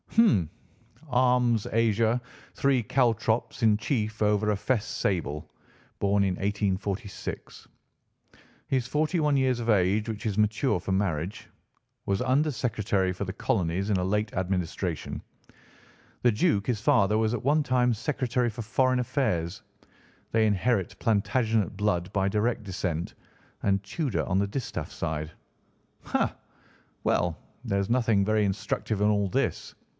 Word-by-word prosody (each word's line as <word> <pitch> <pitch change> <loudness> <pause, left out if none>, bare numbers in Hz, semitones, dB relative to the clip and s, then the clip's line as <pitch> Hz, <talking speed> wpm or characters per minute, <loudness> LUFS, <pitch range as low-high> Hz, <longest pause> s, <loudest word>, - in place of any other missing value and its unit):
Hum! 195 - +4 0.6
'Arms: 125 -3 +2
Azure, 115 +1 +2 0.4
three 135 -2 +2
caltrops 115 0 +1
in 110 -2 +5
chief 110 -1 -2
over 105 0 +2
a 105 - 0
fess 105 +1 0
sable. 85 -8 -2 0.5
Born 100 0 +2
in 95 -2 +1
1846.' 100 0 -3 1.0
He's 130 -2 0
forty 155 +6 0
one 150 -2 +3
years 130 -2 +2
of 115 - -3
age, 105 +2 +2
which 110 +2 -5
is 105 -2 -1
mature 105 +1 +2
for 95 - -4
marriage. 95 0 -1 0.6
Was 100 0 +1
Under 135 +5 +2
Secretary 105 -7 0
for 95 - -4
the 95 - -4
colonies 95 -2 -1
in 105 - +2
a 90 - 0
late 105 +3 0
administration. 90 -2 -2 1.0
The 120 - +5
Duke, 105 -1 +1
his 115 -4 0
father, 105 0 +3
was 110 +1 +1
at 120 - -3
one 150 +3 +3
time 125 -2 +2
Secretary 125 0 -1
for 115 +1 -6
Foreign 130 +3 +2
Affairs. 100 - -1 0.7
They 110 -1 +3
inherit 105 -1 +1
Plantagenet 110 -1 +1
blood 90 -4 0
by 95 -1 +1
direct 110 +3 0
descent, 90 -4 -3 0.5
and 100 -1 +2
Tudor 125 - -2
on 95 0 +1
the 100 - +1
distaff 120 +5 -4
side. 80 -1 -3 0.7
Ha! - - 0 0.7
Well, 85 -2 +1 0.3
there 100 -5 0
is 100 - -2
nothing 115 -5 +2
very 110 0 +2
instructive 100 +1 -1
in 105 - +3
all 100 -2 +2
this. - - -1
105 Hz, 140 wpm, -27 LUFS, 95-120 Hz, 1.0 s, in